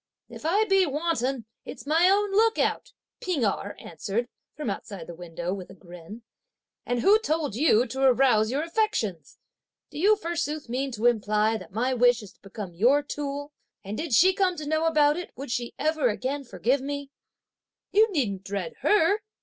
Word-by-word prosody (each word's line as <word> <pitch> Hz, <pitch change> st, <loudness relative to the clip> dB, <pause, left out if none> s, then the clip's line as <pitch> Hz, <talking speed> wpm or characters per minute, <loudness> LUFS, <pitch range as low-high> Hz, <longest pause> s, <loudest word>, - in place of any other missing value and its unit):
"If -, -, -6 dB
I 410 Hz, +6 st, +3 dB
be 390 Hz, -2 st, +4 dB
wanton, 275 Hz, -5 st, -1 dB, 0.2 s
it's -, -, -9 dB
my 325 Hz, +5 st, +4 dB
own 405 Hz, +1 st, +2 dB
look 445 Hz, +3 st, +3 dB
out;" -, -, -1 dB, 0.3 s
P'ing 330 Hz, -11 st, -1 dB
Erh 200 Hz, 0 st, -2 dB
answered, 200 Hz, +9 st, -4 dB, 0.3 s
from 300 Hz, -3 st, -5 dB
outside 195 Hz, -3 st, -5 dB
the 170 Hz, -, -9 dB
window, 175 Hz, +1 st, -5 dB
with 190 Hz, -2 st, -7 dB
a 190 Hz, -, -12 dB
grin, 180 Hz, +5 st, -12 dB, 0.6 s
"and 245 Hz, -1 st, 0 dB
who 415 Hz, -, +5 dB
told 315 Hz, -, -1 dB
you 245 Hz, -2 st, +3 dB
to 265 Hz, +2 st, -5 dB
arouse 250 Hz, -4 st, +4 dB
your 275 Hz, +5 st, -1 dB
affections? 330 Hz, -, -2 dB, 0.5 s
Do -, -, -7 dB
you 415 Hz, +5 st, +5 dB
forsooth 335 Hz, -, -3 dB
mean 265 Hz, +3 st, -2 dB
to 225 Hz, +1 st, -3 dB
imply 215 Hz, -1 st, +2 dB
that 185 Hz, -5 st, -12 dB
my 245 Hz, +6 st, 0 dB
wish 245 Hz, -2 st, +3 dB
is 200 Hz, -, -11 dB
to -, -, -35 dB
become 195 Hz, -2 st, -8 dB
your 250 Hz, +11 st, +3 dB
tool? 285 Hz, 0 st, -5 dB, 0.3 s
And 200 Hz, +1 st, -5 dB
did 310 Hz, +4 st, -4 dB
she 365 Hz, -, +6 dB
come 370 Hz, -1 st, +1 dB
to 305 Hz, -, -6 dB
know 315 Hz, +1 st, +1 dB
about 300 Hz, -2 st, +3 dB
it 355 Hz, -, -5 dB
would 275 Hz, -1 st, -7 dB
she 240 Hz, -1 st, -3 dB
again 310 Hz, -2 st, +1 dB, 0.3 s
ever 280 Hz, -, -12 dB
forgive 255 Hz, +4 st, 0 dB
me?" 285 Hz, 0 st, -5 dB, 0.8 s
"You 430 Hz, +2 st, +4 dB
needn't 210 Hz, -, -1 dB
dread 190 Hz, -4 st, -5 dB
her!" 410 Hz, 0 st, +3 dB
270 Hz, 180 wpm, -26 LUFS, 215-325 Hz, 0.8 s, she